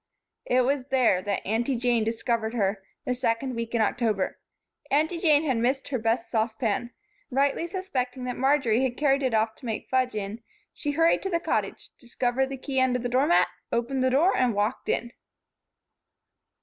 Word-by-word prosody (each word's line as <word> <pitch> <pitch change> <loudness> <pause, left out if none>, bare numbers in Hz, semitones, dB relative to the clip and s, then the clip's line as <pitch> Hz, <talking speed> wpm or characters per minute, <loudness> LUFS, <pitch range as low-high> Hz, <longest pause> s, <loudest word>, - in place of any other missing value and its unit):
It 255 +1 +3
was 265 +1 0
there 250 -9 +3
that 200 +1 -3
Aunty 235 +6 0
Jane 240 -1 +2
discovered 225 0 -1
her, 200 -2 0 0.2
the 250 - 0
second 250 +1 -1
week 230 0 -4
in 230 - +2
October. 220 -3 0 0.5
Aunty 315 +4 +1
Jane 310 -3 +4
had 265 -6 0
missed 255 +4 0
her 260 -3 -1
best 230 +1 0
saucepan. 220 0 -1 0.4
Rightly 280 +5 +1
suspecting 270 -9 -3
that 250 -1 -3
Marjory 265 -4 +2
had 255 -2 -1
carried 280 -2 +2
it 255 -4 +1
off 220 0 +1
to - - -13
make 220 - -4
fudge 255 -2 +1
in, 210 +2 -4 0.3
she 290 -1 -3
hurried 330 +2 +3
to 385 - -3
the 340 -2 +1
Cottage, - - -2
discovered 245 +1 -1
the 270 - -5
key 265 0 -1
under 255 -1 +2
the 245 0 -3
door 260 +4 +2
mat, 345 - +4 0.2
opened 250 +3 0
the 260 - +3
door 300 +9 +3
and 245 -4 +2
walked 210 +4 -1
in. 235 - -1
250 Hz, 180 wpm, -26 LUFS, 230-275 Hz, 0.5 s, Jane